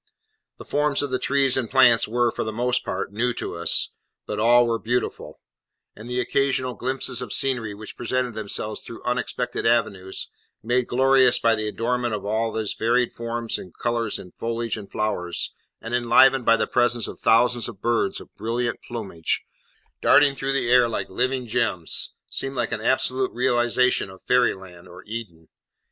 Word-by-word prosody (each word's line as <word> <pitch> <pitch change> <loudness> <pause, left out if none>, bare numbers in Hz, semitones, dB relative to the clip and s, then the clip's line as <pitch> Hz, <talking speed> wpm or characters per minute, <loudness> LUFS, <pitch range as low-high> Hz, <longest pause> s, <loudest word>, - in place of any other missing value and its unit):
The - - -11
forms 145 -1 +1
of 145 - -3
the 130 - 0
trees 135 -1 +2
and 125 -4 -1
plants 125 -3 +5
were, 120 +1 +1
for - - -3
the 110 - -3
most 125 +3 0
part, - - -3
new 120 +3 0
to - - -4
us, 85 0 +1 0.3
but 105 - -4
all 120 +2 +5
were 115 -1 0
beautiful; 120 +3 -3 0.6
and 110 +3 -10
the 125 0 -1
occasional 130 0 0
glimpses 130 0 -3
of 125 -5 -6
scenery 120 -6 -1
which 105 +1 -10
presented 125 0 -1
themselves 105 0 -4
through 115 - -10
unexpected 125 0 -2
avenues, 100 -5 0 0.4
made 125 +2 +1
glorious 130 0 +4
by 115 - +3
the 110 -1 -1
adornment 120 +1 -1
of 100 - -6
all 110 +2 0
these 110 -2 -2
varied 120 +2 +1
forms 115 0 -3
and 90 - -12
colours 115 -2 -1
in 90 - -11
foliage 115 0 -3
and 105 -3 -9
flowers, 90 -5 -2 0.3
and 115 - -6
enlivened 125 +2 +5
by 115 0 +5
the - - +1
presence 120 -1 +1
of - - -9
thousands 120 +1 +3
of 95 - -9
birds 115 -3 0
of - - -14
brilliant 115 +2 -2
plumage, 100 -9 -3 0.6
darting 145 -1 +5
through 135 0 -2
the 130 -3 0
air 125 -1 +6
like 115 - -4
living 130 +4 0
gems, 110 -7 -1
seemed 135 0 -4
like 120 -3 -1
an - - -2
absolute 130 +2 +1
realisation 120 -1 +2
of 95 0 -14
fairy 125 -1 +3
land 90 -2 -13
or 90 - -12
Eden. 105 -8 -7
120 Hz, 175 wpm, -24 LUFS, 110-125 Hz, 0.6 s, air